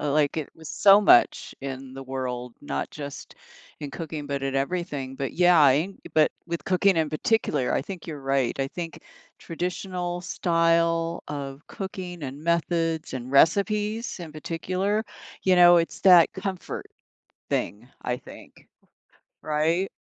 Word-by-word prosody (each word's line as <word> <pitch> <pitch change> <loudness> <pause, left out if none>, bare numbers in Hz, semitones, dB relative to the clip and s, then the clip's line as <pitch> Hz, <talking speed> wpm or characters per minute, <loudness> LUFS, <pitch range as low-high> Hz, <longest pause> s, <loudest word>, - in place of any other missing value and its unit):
Like, 150 +1 +1
it 155 - -4
was 160 0 -9
so 195 +5 +6
much 200 -12 +4
in 135 -1 -6
the 135 0 -8
world, 125 -2 -5
not 145 - -3
just 145 -1 -8 0.5
in 145 - -5
cooking, 155 -1 -6
but 140 -1 -3
at 135 0 -2
everything, 140 -2 -2
but 135 0 -4
yeah, 175 -5 +6
ing 170 +8 -1 0.2
but 155 -1 +4
with 170 0 -4
cooking 190 0 +3
in 160 -2 +1
particular, 155 - 0
I - - 0
think 180 +3 -8
you're 155 -4 -6
right, 135 -2 0
I 135 - 0
think 170 +2 -7 0.4
traditional 175 +1 -4
style 165 -1 +1
of 140 0 -6
cooking, 185 -3 -7
and 140 +2 -6
methods, 165 -1 0
and 130 -1 -5
recipes 210 - +2
in 165 -3 -8
particular, 185 +7 -2 0.4
you 185 - +4
know, 175 -1 +8
it's 165 -1 0
that 180 -4 +7
comfort 190 -1 -5 0.6
thing, 110 +5 -2
I 125 0 -1
think. - - -14 0.8
Right? 160 +5 +1
165 Hz, 145 wpm, -25 LUFS, 140-180 Hz, 0.8 s, know